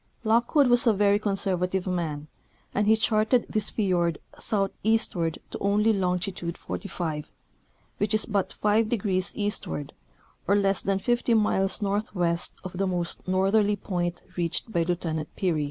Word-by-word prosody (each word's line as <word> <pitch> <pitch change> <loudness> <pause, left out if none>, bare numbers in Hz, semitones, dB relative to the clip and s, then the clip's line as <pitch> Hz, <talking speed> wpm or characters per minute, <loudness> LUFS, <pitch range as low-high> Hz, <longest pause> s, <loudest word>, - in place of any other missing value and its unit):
Lock 230 +4 +1
wood 285 -3 +6
was 245 0 +4
a 225 - +6
very 205 0 +3
conservative 190 -3 0
man, 160 -5 -3 0.5
and 210 +1 +1
he 220 - +6
charted 220 +2 +2
this 215 -2 +1
fiord 175 -6 0 0.2
southeastward 195 -4 0
to - - -5
only 210 +2 +2
longitude 180 -2 -2
45, 160 -7 -5 0.7
which 205 +1 +1
is 215 - +3
but 200 -4 -1
five 215 +1 +1
degrees 195 -4 0
eastward, 205 -8 -2 0.5
or 200 - +4
less 195 -1 +2
than 195 -1 0
fifty 240 +3 +1
miles 205 -2 +1
northwest 195 -4 0
of 185 0 -7
the 195 - +1
most 175 -1 -2
northerly 200 +3 +2
point 175 -3 -3
reached 175 +5 0
by 170 - +1
Lieutenant 165 -2 -2
Peary. 175 -5 0
195 Hz, 145 wpm, -26 LUFS, 175-215 Hz, 0.7 s, wood